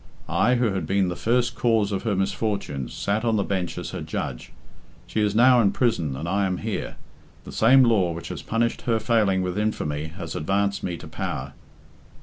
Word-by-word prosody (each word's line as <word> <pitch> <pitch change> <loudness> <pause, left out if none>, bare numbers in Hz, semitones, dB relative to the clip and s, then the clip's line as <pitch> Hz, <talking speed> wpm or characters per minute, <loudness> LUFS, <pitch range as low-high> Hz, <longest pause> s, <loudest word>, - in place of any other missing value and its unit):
I, 95 +9 +2
who 120 -4 +1
had 90 -5 -3
been 95 -1 +2
the 90 - -3
first 120 +4 +1
cause 110 -4 +1
of 95 - -1
her 110 -4 -1
misfortunes, 95 - -2
sat 105 +3 -1
on 115 -2 +2
the 100 - +1
bench 95 -3 -2
as - - -5
her - - -5
judge. - - -5 0.5
She 110 - -2
is 105 -1 +1
now 125 +1 +6
in 100 -3 +3
prison 85 - 0
and 75 +5 -5
I 95 +2 +1
am 90 -1 -1
here. 110 -2 -4 0.5
The - - -9
same 130 +4 +5
law 105 -8 +3
which 85 0 -6
has - - -5
punished 115 +1 -1
her 115 -1 +3
failing 105 -4 +2
with 90 +2 -2
infamy 75 -9 -1
has 85 +4 -7
advanced 100 +5 0
me 90 -2 -3
to - - -10
power." - - -4
100 Hz, 200 wpm, -24 LUFS, 90-115 Hz, 0.5 s, now